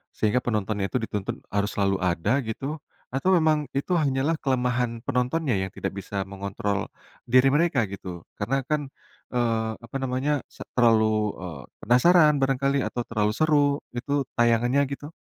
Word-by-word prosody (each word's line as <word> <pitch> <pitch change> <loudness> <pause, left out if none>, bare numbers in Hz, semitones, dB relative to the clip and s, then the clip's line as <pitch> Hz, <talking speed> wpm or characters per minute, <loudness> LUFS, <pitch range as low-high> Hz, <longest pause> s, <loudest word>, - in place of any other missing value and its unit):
sehingga 110 +4 +2
penontonnya 105 -3 -1
itu 125 - +1
dituntut 105 -3 -4
harus 100 0 0
selalu 100 -1 +1
ada 90 +9 +1
gitu? 135 +7 -4 0.3
Atau 135 +9 +1
memang 155 -3 +2
itu 160 +6 0
hanyalah 145 0 +1
kelemahan 125 -3 0
penontonnya 125 0 0
yang 95 -1 -2
tidak - - -4
bisa 100 0 -4
mengontrol 100 +1 -3 0.4
diri 130 +2 +5
mereka 145 - +2
gitu? 90 -3 -8 0.2
Karena 135 +6 0
kan, 150 -2 -1 0.4
eee, 115 -2 0
apa 115 +3 -13
namanya 135 +3 0
se - - -9
terlalu, 110 -3 +3
eee, 80 -7 -7 0.2
penasaran 150 +5 +5
barangkali 135 +1 +1
atau 120 - -3
terlalu 105 -2 +1
seru 150 -2 +3 0.3
itu 140 +3 -1
tayangannya 120 +3 +3
gitu? 145 +3 -6
125 Hz, 145 wpm, -25 LUFS, 105-140 Hz, 0.4 s, diri